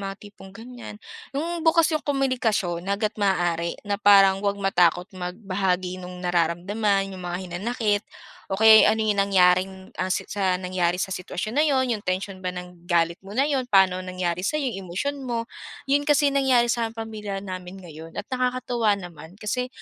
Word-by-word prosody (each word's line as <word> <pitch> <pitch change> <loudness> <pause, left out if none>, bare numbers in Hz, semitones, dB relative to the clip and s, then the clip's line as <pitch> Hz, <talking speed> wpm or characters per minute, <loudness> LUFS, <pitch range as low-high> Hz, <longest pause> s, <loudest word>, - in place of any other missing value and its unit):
mga 195 0 -5
tipong, 200 -1 -13
ganiyan. 230 +2 -10 0.4
'Yong 335 +3 -2
bukas 325 0 +3
'yong 310 - +1
komunikasyon 225 -11 -1
hangga't 210 +2 0
maaari, 175 -4 0
na 200 0 -2
parang 195 -2 +6
wag 200 0 0
matakot 180 -3 +2
magbahagi 185 -1 -2
no'ng 180 0 -9
nararamdaman, 195 +4 0
'yong 185 - -8
mga 175 0 -4
hinanakit 205 +4 -1 0.5
o 190 - -2
kaya'y 220 0 +8
ano 220 +1 +2
'yong 215 - +2
nangyaring, 185 -1 +3 0.3
ah, 185 - -1
si 185 - -1
sa 190 -2 0
nangyari 180 -1 -1
sa 190 +1 -2
sitwasyon 185 +4 -5
na - - +4
'yon, 265 -2 +2
'yong 215 - -3
tensyon 185 +1 -3
ba 185 - -3
ng 180 -1 -9
galit 170 0 +1
mo 195 +2 -10
na 270 - +4
'yon, 270 -4 -1
pa'no 190 -3 +4
nangyari 180 -1 -3
sa'yo, 215 +11 -1 0.2
'yong 190 -3 -8
emosyon 280 +11 -3
mo. 235 -3 -3 0.4
'Yon 285 +2 +1
kasi 290 -1 +4
nangyari 255 -4 +3
sa 230 -1 -1
pamilya 215 -3 -6
namin 185 -1 -7
ngayon 160 0 -11
at - - -4
nakakatuwa 250 -4 0
naman, 175 -2 -11
kasi 225 +4 -3
195 Hz, 175 wpm, -24 LUFS, 180-230 Hz, 0.5 s, kaya'y